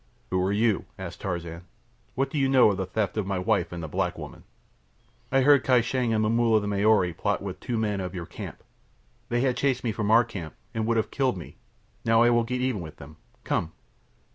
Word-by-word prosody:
"Who 95 Hz, 0 st, +1 dB
are 95 Hz, +2 st, +1 dB
you?" 105 Hz, 0 st, +1 dB
asked 90 Hz, -3 st, -8 dB
Tarzan. 85 Hz, -3 st, -4 dB, 0.5 s
"What 135 Hz, +1 st, 0 dB
do 150 Hz, -, -1 dB
you 135 Hz, -1 st, +2 dB
know 130 Hz, -5 st, +6 dB
of 100 Hz, -, -3 dB
the 95 Hz, -, -2 dB
theft 100 Hz, +1 st, -2 dB
of 105 Hz, -3 st, -1 dB
my 100 Hz, -1 st, -1 dB
wife 90 Hz, -, 0 dB
and 85 Hz, -1 st, -6 dB
the -, -, -4 dB
black -, -, -2 dB
woman?" -, -, -9 dB, 0.9 s
"I 135 Hz, 0 st, +4 dB
heard 140 Hz, 0 st, +5 dB
Kai 125 Hz, -2 st, +4 dB
Shang 120 Hz, 0 st, -1 dB
and 110 Hz, -1 st, +2 dB
Momulla 115 Hz, 0 st, +3 dB
the 105 Hz, -, -4 dB
Maori 100 Hz, -3 st, +3 dB
plot 100 Hz, +4 st, -1 dB
with 100 Hz, -2 st, -6 dB
two 120 Hz, -3 st, -3 dB
men 105 Hz, -2 st, 0 dB
of 90 Hz, 0 st, -5 dB
your 85 Hz, -2 st, -4 dB
camp. -, -, -9 dB, 0.7 s
They 120 Hz, 0 st, +1 dB
had 130 Hz, -2 st, +1 dB
chased 130 Hz, -3 st, +1 dB
me 115 Hz, -, 0 dB
from 105 Hz, -1 st, -2 dB
our 115 Hz, +2 st, +6 dB
camp, 85 Hz, -9 st, -8 dB, 0.2 s
and 110 Hz, -1 st, -1 dB
would 115 Hz, 0 st, +2 dB
have 110 Hz, -, 0 dB
killed 130 Hz, -7 st, 0 dB
me. 85 Hz, -, -10 dB, 0.5 s
Now 115 Hz, +1 st, +4 dB
I 120 Hz, -, +5 dB
will 120 Hz, 0 st, +3 dB
get 125 Hz, +2 st, -2 dB
even 125 Hz, -6 st, -1 dB
with 80 Hz, -3 st, -9 dB
them. 75 Hz, +2 st, -13 dB, 0.3 s
Come!" 80 Hz, -1 st, -1 dB
110 Hz, 225 wpm, -26 LUFS, 95-120 Hz, 0.9 s, know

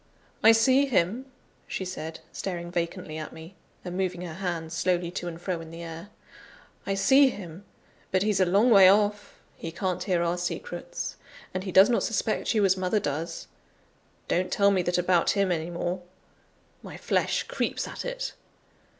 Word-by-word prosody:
"I 225 Hz, -, +8 dB
see 260 Hz, +5 st, +4 dB
him," 235 Hz, +2 st, 0 dB, 0.4 s
she 190 Hz, -, -4 dB
said, 160 Hz, -3 st, -6 dB
staring 175 Hz, -2 st, -5 dB
vacantly 170 Hz, -2 st, -3 dB
at 155 Hz, -, -6 dB
me, 160 Hz, +3 st, -11 dB, 0.3 s
and 180 Hz, 0 st, -5 dB
moving 185 Hz, -2 st, -2 dB
her 175 Hz, -3 st, -6 dB
hands 170 Hz, -2 st, -4 dB
slowly 175 Hz, 0 st, 0 dB
to 175 Hz, -1 st, -4 dB
and 165 Hz, -1 st, -6 dB
fro 175 Hz, -1 st, -3 dB
in 165 Hz, -, -10 dB
the 165 Hz, +1 st, -8 dB
air. 165 Hz, +4 st, -8 dB, 0.8 s
"I 195 Hz, -, 0 dB
see 265 Hz, +8 st, +5 dB
him! 185 Hz, -4 st, -9 dB, 0.4 s
But 190 Hz, 0 st, +1 dB
he's 210 Hz, -2 st, +1 dB
a 185 Hz, -, +5 dB
long 205 Hz, +7 st, +4 dB
way 195 Hz, -3 st, +9 dB
off; 205 Hz, +1 st, +1 dB, 0.2 s
he 165 Hz, -, -6 dB
can't 185 Hz, +1 st, -2 dB
hear 180 Hz, -3 st, +1 dB
our 170 Hz, +1 st, 0 dB
secrets, 485 Hz, -, -5 dB, 0.4 s
and 185 Hz, +1 st, -3 dB
he 190 Hz, -, -3 dB
does 190 Hz, +2 st, +7 dB
not 240 Hz, -, +2 dB
suspect 225 Hz, +1 st, -1 dB
you 210 Hz, -2 st, +4 dB
as 190 Hz, -1 st, +4 dB
mother 185 Hz, +3 st, 0 dB
does. 155 Hz, -1 st, -4 dB, 0.8 s
Don't 180 Hz, +1 st, 0 dB
tell 200 Hz, 0 st, +4 dB
me 190 Hz, -2 st, +2 dB
that 175 Hz, 0 st, 0 dB
about 180 Hz, -1 st, +3 dB
him 195 Hz, -2 st, +2 dB
any 165 Hz, -1 st, -1 dB
more; 175 Hz, +1 st, -3 dB, 0.8 s
my -, -, -9 dB
flesh -, -, 0 dB
creeps -, -, -2 dB
at -, -, -6 dB
it! -, -, -4 dB
185 Hz, 175 wpm, -27 LUFS, 170-205 Hz, 0.8 s, way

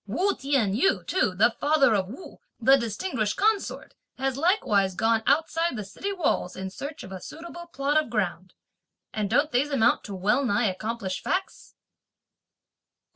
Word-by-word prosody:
Wu 365 Hz, -, +1 dB
T'ien 265 Hz, -8 st, 0 dB
yu 385 Hz, -, +2 dB
too, 210 Hz, -, 0 dB
the 220 Hz, +5 st, +4 dB
father 285 Hz, -5 st, +4 dB
of 190 Hz, -3 st, +1 dB
Wu, 255 Hz, -, -11 dB, 0.2 s
the 265 Hz, +3 st, +6 dB
distinguished 230 Hz, -, -2 dB
consort, 420 Hz, 0 st, 0 dB, 0.2 s
has 270 Hz, 0 st, -1 dB
likewise 260 Hz, -, +2 dB
gone 225 Hz, +2 st, +2 dB
outside 325 Hz, +3 st, +1 dB
the 210 Hz, -, -4 dB
city 205 Hz, -, -5 dB
walls 340 Hz, -, -1 dB
in 190 Hz, 0 st, -5 dB
search 285 Hz, +9 st, -7 dB
of 190 Hz, -, -10 dB
a 190 Hz, -1 st, -7 dB
suitable 345 Hz, +2 st, -9 dB
plot 290 Hz, 0 st, +1 dB
of -, -, -12 dB
ground; 185 Hz, -4 st, -2 dB, 0.6 s
and 210 Hz, -2 st, -2 dB
don't 295 Hz, +7 st, +2 dB
these 260 Hz, +4 st, +1 dB
amount 265 Hz, -6 st, +2 dB
to 200 Hz, -, -6 dB
well 210 Hz, +9 st, +1 dB
nigh 240 Hz, -1 st, +1 dB
accomplished 200 Hz, 0 st, -3 dB
facts?" 380 Hz, +1 st, -3 dB
250 Hz, 160 wpm, -26 LUFS, 205-310 Hz, 0.6 s, the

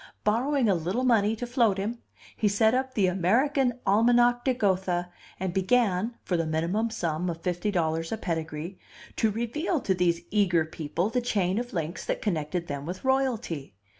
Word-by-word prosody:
Borrowing 250 Hz, +4 st, +2 dB
a 200 Hz, -, +4 dB
little 180 Hz, +8 st, -1 dB
money 225 Hz, -4 st, +3 dB
to 245 Hz, -, -4 dB
float 235 Hz, -5 st, +2 dB
him, 220 Hz, +5 st, -3 dB, 0.4 s
he 215 Hz, -, +1 dB
set 220 Hz, +2 st, +3 dB
up 260 Hz, 0 st, -1 dB
The 205 Hz, -, +3 dB
American 245 Hz, -, +2 dB
Almanach 240 Hz, +4 st, +4 dB
de 260 Hz, -2 st, +1 dB
Gotha 185 Hz, -5 st, 0 dB, 0.3 s
and 185 Hz, -2 st, -2 dB
began 215 Hz, +2 st, +1 dB
(for 180 Hz, -, -1 dB
the 165 Hz, -1 st, 0 dB
minimum 170 Hz, +9 st, 0 dB
sum 175 Hz, -5 st, -2 dB
of 165 Hz, -1 st, -5 dB
fifty 180 Hz, +3 st, -1 dB
dollars 165 Hz, -3 st, -1 dB
a 225 Hz, -, -1 dB
pedigree) 160 Hz, -1 st, -4 dB, 0.4 s
to 220 Hz, -, +3 dB
reveal 235 Hz, -, -1 dB
to 190 Hz, -, +1 dB
these 175 Hz, -2 st, +1 dB
eager 180 Hz, -6 st, +3 dB
people 160 Hz, +5 st, -3 dB
the 250 Hz, -, +1 dB
chain 200 Hz, -4 st, 0 dB
of 245 Hz, 0 st, -5 dB
links 165 Hz, -1 st, -3 dB
that -, -, -1 dB
connected 170 Hz, -3 st, -2 dB
them 145 Hz, -1 st, -5 dB
with 185 Hz, +7 st, -6 dB
royalty. 240 Hz, -, -1 dB
200 Hz, 175 wpm, -27 LUFS, 175-235 Hz, 0.4 s, a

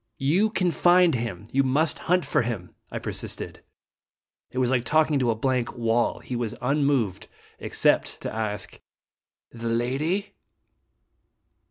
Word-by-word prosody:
"You 175 Hz, +11 st, +2 dB
can 185 Hz, -5 st, +1 dB
find 175 Hz, 0 st, +5 dB
him. 115 Hz, -5 st, -4 dB
You 135 Hz, -, +3 dB
must 145 Hz, +4 st, +1 dB
hunt 180 Hz, 0 st, +3 dB
for -, -, +2 dB
him," 110 Hz, -7 st, -4 dB, 0.2 s
I -, -, -5 dB
persisted. -, -, -5 dB, 0.9 s
It -, -, -10 dB
was 130 Hz, -1 st, +2 dB
like 125 Hz, -3 st, +2 dB
talking 155 Hz, 0 st, +3 dB
to 125 Hz, -2 st, +1 dB
a 115 Hz, -, +2 dB
blank 125 Hz, 0 st, -1 dB
wall. 115 Hz, 0 st, +1 dB
He 125 Hz, -, -5 dB
was 120 Hz, -1 st, -2 dB
unmoved 130 Hz, -7 st, +1 dB, 0.3 s
except -, -, +1 dB
to -, -, -4 dB
ask: 105 Hz, -3 st, -4 dB, 0.4 s
" -, -, -68 dB
The 115 Hz, 0 st, -4 dB
lady 135 Hz, -, -1 dB
130 Hz, 145 wpm, -25 LUFS, 115-155 Hz, 0.9 s, find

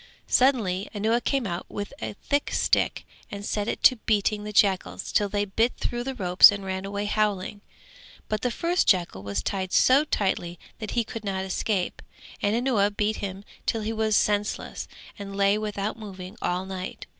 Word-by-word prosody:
Suddenly 215 Hz, -8 st, +2 dB
Anuwa 220 Hz, +4 st, +1 dB
came 270 Hz, -4 st, 0 dB
out 175 Hz, -2 st, -4 dB
with 205 Hz, +5 st, -5 dB
a -, -, -4 dB
thick 285 Hz, 0 st, 0 dB
stick -, -, +1 dB, 0.2 s
and 200 Hz, 0 st, -6 dB
set 210 Hz, +1 st, -2 dB
to 255 Hz, -, +7 dB
beating 210 Hz, -1 st, 0 dB
the 210 Hz, -, -5 dB
jackals 195 Hz, -2 st, +1 dB
till 205 Hz, -1 st, +2 dB
they 205 Hz, 0 st, 0 dB
bit 225 Hz, +5 st, +1 dB
through 240 Hz, 0 st, -3 dB
the 265 Hz, +1 st, -4 dB
ropes 180 Hz, -5 st, +7 dB
and 200 Hz, -1 st, -5 dB
ran 190 Hz, 0 st, -3 dB
away 200 Hz, +1 st, -3 dB
howling; 205 Hz, -1 st, -1 dB, 0.7 s
but 215 Hz, -1 st, -2 dB
the 250 Hz, -, +1 dB
first 345 Hz, +8 st, 0 dB
jackal 175 Hz, -, +2 dB
was 100 Hz, -1 st, -3 dB
tied 190 Hz, -2 st, -2 dB
so 270 Hz, +3 st, +5 dB
tightly 190 Hz, -, -1 dB, 0.2 s
that 215 Hz, +1 st, -5 dB
he 235 Hz, -, +4 dB
could 225 Hz, 0 st, -7 dB
not 190 Hz, -2 st, -2 dB
escape, 190 Hz, 0 st, -1 dB, 0.4 s
and 205 Hz, +2 st, +1 dB
Anuwa 235 Hz, -5 st, +2 dB
beat 215 Hz, +1 st, +1 dB
him 195 Hz, 0 st, -5 dB, 0.2 s
till 225 Hz, -, 0 dB
he 220 Hz, +1 st, -2 dB
was 220 Hz, -1 st, +1 dB
senseless 210 Hz, 0 st, -1 dB, 0.3 s
and 200 Hz, -1 st, -7 dB
lay 200 Hz, 0 st, +3 dB
without 210 Hz, 0 st, -3 dB
moving 190 Hz, -2 st, -8 dB
all 180 Hz, +1 st, -1 dB
night. 190 Hz, -1 st, -6 dB
205 Hz, 180 wpm, -26 LUFS, 190-220 Hz, 0.7 s, to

